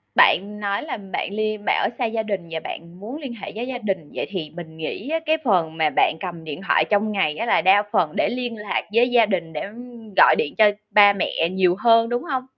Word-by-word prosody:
bạn 205 +3 +4
nói 200 -1 -2
là 300 - -5
bạn 195 0 -5
ly 215 0 -1
bảo - - +2
xa 245 - 0
gia 225 0 -2
đình 195 -5 -4
và 165 - -3
bạn 170 +2 -8
muốn 225 +8 -7
liên 265 -4 -6
hệ 225 - -8
với 235 +3 -4
gia 260 -2 -4
đình, 190 -9 -4
vậy - - -3
thì 180 -6 -5
mình 160 -2 -9
nghĩ 200 - -5
á, 325 - 0
cái 315 +1 +2
phần 170 -8 +1
mà 155 -1 +2
bạn - - +3
cầm 170 -3 -6
điện 155 +3 -7
thoại - - +3
trong 210 +1 +1
ngày 155 -7 0
á, 230 - -2
là 215 - +3
đa 200 +1 +5
phần 155 -3 +1
để - - +1
liên 245 -2 -4
lạc 210 -1 -2
với 240 +2 +4
gia 235 -2 +5
đình, 175 -5 -3
để 150 - -4 0.5
gọi - - +7
điện 145 - -1
cho 215 -1 +6 0.2
ba 205 -1 +7
mẹ 170 -3 -1
nhiều 185 -1 +2
hơn, 230 0 +4
đúng 240 0 -2
hông? 265 -6 -2
205 Hz, 245 wpm, -22 LUFS, 175-230 Hz, 0.5 s, gọi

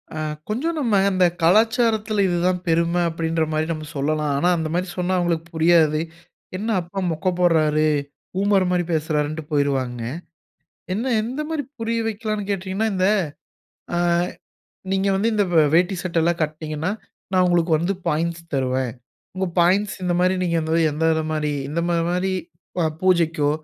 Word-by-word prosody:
ஆ. - - -5 0.3
கொஞ்சம் 315 +10 -1
நம்ம, 240 -7 0 0.2
அந்த 185 -2 +3 0.2
கலாச்சாரத்துல, 220 +3 +3
இது 175 -1 0
தான் 180 -1 0
பெரும 170 +1 +2 0.2
அப்படீன்ற 165 0 -1
மாரி 155 0 +1
நம்ம 155 -1 -4
சொல்லலாம். 150 +1 0
ஆனா, 175 +5 +2
அந்த 160 -1 -2
மாரி 180 +2 0
சொன்னா 180 +1 0
அவுங்களுக்கு 170 -2 0
புரியாது. 160 -2 +4 0.6
என்ன 215 +4 -3
அப்பா 175 +3 -6
மொக்க 165 +4 -1
போட்றாரு? 155 -3 +3 0.5
பூமர் 195 0 +2
மாரி 180 -1 +2
பேசுறாருன்ட்டு 155 0 -1
போயிருவாங்க. 135 -4 0 0.9
என்ன 230 +7 -1
எந்த 250 +6 -4
மாரி 315 -2 -1 0.2
புரிய 230 0 -1
வைக்கலாம்ன்னு 215 -2 -3
கேட்டீங்கன்னா, 195 +3 -1
இந்த 185 0 +2 0.9
அ - - +1 0.9
நீங்க 195 +1 +1
வந்து 205 +4 +1
இந்த 210 -1 +3
வே 160 - +6
வேட்டி, 180 +3 +3
சட்டைலாம் 170 -1 0
கட்னீங்கன்னா, 155 +2 -2 0.4
நான் 185 -1 +4
உங்களுக்கு 175 -1 +2
வந்து, 175 +5 0
பாயிண்ட்ஸ் 165 +2 -1
தருவேன். 130 -2 0 0.5
உங்க 190 0 0
பாயிண்ட்ஸ் 190 +4 +3
இந்த 180 - +1
மாரி 185 +1 +3
நீங்க 170 -2 0
வந்து 160 +1 0
எந்த 155 +2 -2
இது 160 - 0
மாரி 150 -1 -1 0.2
இந்த 155 +4 -1
மா 170 - +1
மாரி 180 +2 0 0.5
அ - - +2 0.2
பூஜைக்கோ, 165 -5 +2
175 Hz, 150 wpm, -22 LUFS, 155-195 Hz, 0.9 s, வே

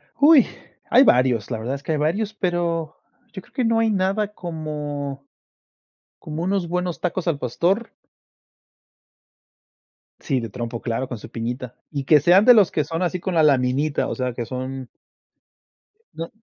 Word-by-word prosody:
Uy, 295 -3 +6 0.4
hay 255 +3 +7
varios, 125 - +3
la 110 - -2
verdad 125 +5 -3
es 140 - -9
que - - -3
hay 155 - 0
varios, 200 +9 -1
pero, 170 -4 -2 0.4
yo 190 - -7
creo - - -25
que 255 -2 0
no 225 0 +2
hay 225 0 +2
nada 200 +2 0
como 150 -5 -5 0.9
como 155 +1 -5
unos 190 -1 -1
buenos 180 0 -2
tacos 180 0 -2
al 155 -4 0
pastor. 175 - -1 2.3
Sí, 135 -4 -1
de 115 -2 -5
trompo, 115 +2 -5
claro, 120 +2 -2
con 120 - -6
su - - -11
piñita. 120 +2 -5 0.2
Y 140 -3 -3
que 150 +1 +6
sean, 175 +7 +5
de 250 - +9
los 205 -5 +5
que 150 - 0
son, 165 +4 -3
así 180 +1 -1
con 180 0 -3
la 160 - +4
laminita. 140 +1 +2
O - - -3
sea, 125 -2 -2
que 120 -1 -4
son 130 +1 -6 1.3
No. 165 +1 -5
155 Hz, 170 wpm, -22 LUFS, 130-185 Hz, 2.3 s, de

